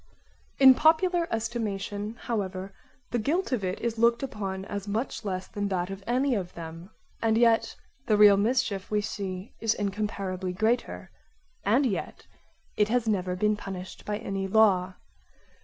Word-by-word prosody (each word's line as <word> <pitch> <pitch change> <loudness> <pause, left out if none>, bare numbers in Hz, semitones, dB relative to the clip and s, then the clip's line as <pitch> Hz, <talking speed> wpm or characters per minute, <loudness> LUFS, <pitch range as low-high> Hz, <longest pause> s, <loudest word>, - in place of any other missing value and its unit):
In 265 -1 +9
popular 335 +4 +3
estimation 215 -2 -3
however 195 -4 -3 0.4
the 240 - 0
guilt 325 - 0
of 240 -6 0
it 185 +1 -2
is 230 -1 -2
looked 235 +2 +3
upon 195 -7 -4
as 200 0 -5
much 225 +4 -3
less 185 -2 -3
than 205 -1 -3
that 185 -1 -2
of 195 0 -7
any 255 +3 +2
of 185 -5 -3
them; 165 +2 -8 0.3
and 225 -1 +2
yet 230 -1 +3 0.3
the 215 -3 +3
real 205 -1 +8
mischief 210 -2 0
we 210 -1 +1
see 195 -1 -5
is 225 -1 +1
incomparably 195 -3 -3
greater, 220 +6 -1 0.5
and 245 +8 +3
yet 215 -7 -3 0.5
it 210 - +3
has 240 -1 +1
never 185 -4 0
been 210 +3 +2
punished 190 -2 -8
by 210 0 -2
any 195 -2 -3
law. 190 -3 +3
210 Hz, 155 wpm, -27 LUFS, 190-235 Hz, 0.5 s, In